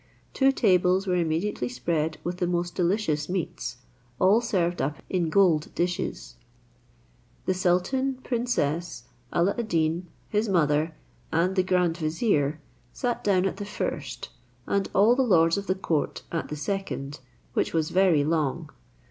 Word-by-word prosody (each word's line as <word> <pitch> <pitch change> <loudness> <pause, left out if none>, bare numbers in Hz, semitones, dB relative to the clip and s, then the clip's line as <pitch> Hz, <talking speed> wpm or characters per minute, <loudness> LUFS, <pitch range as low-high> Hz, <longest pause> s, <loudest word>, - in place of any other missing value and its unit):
Two 270 0 +4
tables 185 -5 +3
were 185 - 0
immediately 165 -4 -1
spread 155 +5 -1
with 175 +1 -3
the 180 - +1
most 175 0 -1
delicious 175 -5 0
meats, 180 -8 -3 0.4
all 200 - +4
served 180 -7 0
up 145 +1 -1
in 175 -3 +1
gold 165 -4 +3
dishes. 170 - -2 1.1
The 185 - +2
sultan, 185 +10 +1
princess, 175 - -1 0.3
Alla 175 +4 +2
ad 235 - -2
Deen, 165 0 0 0.2
his 210 +1 0
mother, 155 -3 +2 0.4
and 175 +4 +1
the 185 - +4
grand 180 -2 +1
vizier, 155 - 0 0.3
sat 245 -1 -2
down 190 -2 +3
at 195 - -1
the 205 - -4
first, 135 -10 -4 0.4
and 200 -1 0
all 215 +5 +6
the 265 - +2
lords 165 -9 +4
of 200 0 -4
the 185 - +1
court 165 -6 -2
at 165 - -2
the 150 - -4
second, 145 -5 -4 0.3
which - - 0
was 160 -2 0
very 180 -6 +4
long. 155 0 -1
175 Hz, 150 wpm, -26 LUFS, 155-195 Hz, 1.1 s, all